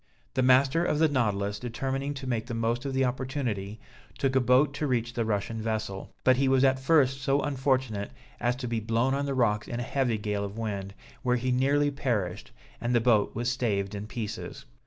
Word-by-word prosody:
The - - +1
master 130 +5 +4
of 150 - +1
the 160 +1 +5
Nautilus 105 -7 0
determining 135 +4 -3
to 135 -1 -7
make 120 -3 -2
the 120 - -4
most 115 +3 -1
of 135 - -2
the 135 0 +3
opportunity, 125 -6 -3 0.4
took 135 -1 0
a - - +6
boat 130 +3 +4
to 150 +1 -2
reach 120 -2 0
the 115 -2 -1
Russian 110 +1 -2
vessel; 110 -3 -3
but 130 -1 +5
he 135 0 +2
was 130 0 +4
at 135 -1 +4
first 135 -2 +3
so 135 +1 +2
unfortunate 130 -7 0 0.3
as 120 0 +1
to 125 -1 -5
be 115 -1 -1
blown 115 +4 +1
on 140 +1 -1
the 135 - -1
rocks 105 -4 +1
in 120 - -4
a - - -2
heavy 125 -2 0
gale 105 -1 -2
of 100 +1 -6
wind, 100 -3 -4 0.3
where 125 -2 +2
he 125 +1 -1
nearly 140 +3 +2
perished, 105 -10 -2 0.3
and 120 +1 0
the - - +5
boat 115 -3 +2
was 120 +1 -2
staved 105 -5 -1
in 105 +1 -5
pieces. 110 - -6
125 Hz, 210 wpm, -28 LUFS, 110-135 Hz, 0.4 s, a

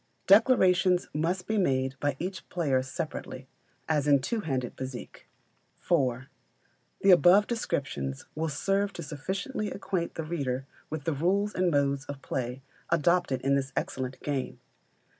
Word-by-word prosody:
Declarations 185 -4 +5
must 170 +4 -1
be 220 -1 0
made 130 -6 +1
by 145 -2 0
each 185 +1 -5
player 140 -7 +1
separately, 135 -2 -6 0.4
as 150 -2 +1
in 140 -1 +6
two 220 - -2
handed 130 - -2
bézique. 130 -1 -7 0.7
iv. 130 -6 +2 0.8
The 195 - +6
above 180 +3 +7
descriptions 120 - -3
will 160 +1 -2
serve 195 +6 0
to - - -6
sufficiently 190 - -3
acquaint 190 -4 -3
the 165 - -3
reader 135 -5 -2 0.2
with 155 -2 -4
the 165 - 0
rules 195 +8 +1
and 180 -1 +2
modes 140 -2 +1
of 140 -1 -8
play 125 +1 -3 0.3
adopted 170 -4 +2
in 135 +1 +2
this 135 -1 0
excellent 130 0 -3
game. 140 -3 -3
155 Hz, 140 wpm, -28 LUFS, 135-185 Hz, 0.8 s, above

